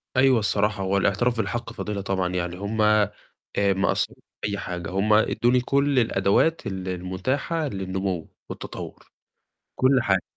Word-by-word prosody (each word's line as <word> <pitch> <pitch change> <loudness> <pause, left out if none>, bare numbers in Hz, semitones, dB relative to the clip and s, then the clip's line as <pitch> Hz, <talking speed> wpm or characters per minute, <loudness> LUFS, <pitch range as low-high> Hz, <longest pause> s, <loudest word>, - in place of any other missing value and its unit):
أيوه 130 -2 +5
الصراحة، 105 -1 0
هوالاعتراف 100 +5 +1
بالحق 115 +1 -2
فضيلة 105 -3 -4
طبعًا، 95 -2 -1
يعني 90 0 -2
هُم 105 +3 -2
آآ 105 -1 +4 0.5
ما 100 -1 +2
قصروش - - 0 0.2
في - - -1
أي 100 - -2
حاجة، 90 0 -5
هُم 100 +3 +1
إدوني 120 +3 +3
كلّ 140 +1 +2
الأدوات 110 +8 +2
ال 95 -1 -4
المتاحة 95 - -2
للنمو 95 - -3 0.2
والتطور، - - -8 0.7
كلّ 130 0 +4
حاجة. 95 -4 +2
100 Hz, 140 wpm, -25 LUFS, 95-120 Hz, 0.7 s, أيوه